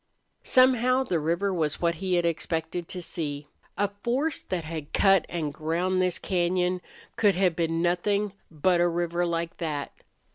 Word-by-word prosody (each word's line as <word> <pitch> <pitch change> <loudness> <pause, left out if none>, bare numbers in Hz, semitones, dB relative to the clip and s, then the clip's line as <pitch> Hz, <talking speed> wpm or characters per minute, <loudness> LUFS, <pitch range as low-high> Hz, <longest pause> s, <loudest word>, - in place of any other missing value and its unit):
Somehow 255 0 +4
the 175 -10 0
river 170 +6 0
was 155 -4 -1
what 170 -1 +2
he 185 -1 +1
had 175 -1 +2
expected 165 +1 -2
to 185 -2 -6
see. 145 -4 -4 0.3
A 205 - +2
force 270 +7 0
that 180 -3 -3
had 155 -2 -7
cut 195 -2 +4
and 155 -4 -3
ground 175 +5 0
this 180 -1 +1
cañon 180 0 0 0.4
could 205 -3 +4
have 180 -2 +2
been 165 0 0
nothing 200 +3 +1 0.2
but 170 +3 +2
a 175 - +4
river 175 0 0
like 170 0 -2
that. 150 -4 -3
175 Hz, 160 wpm, -27 LUFS, 165-190 Hz, 0.4 s, Somehow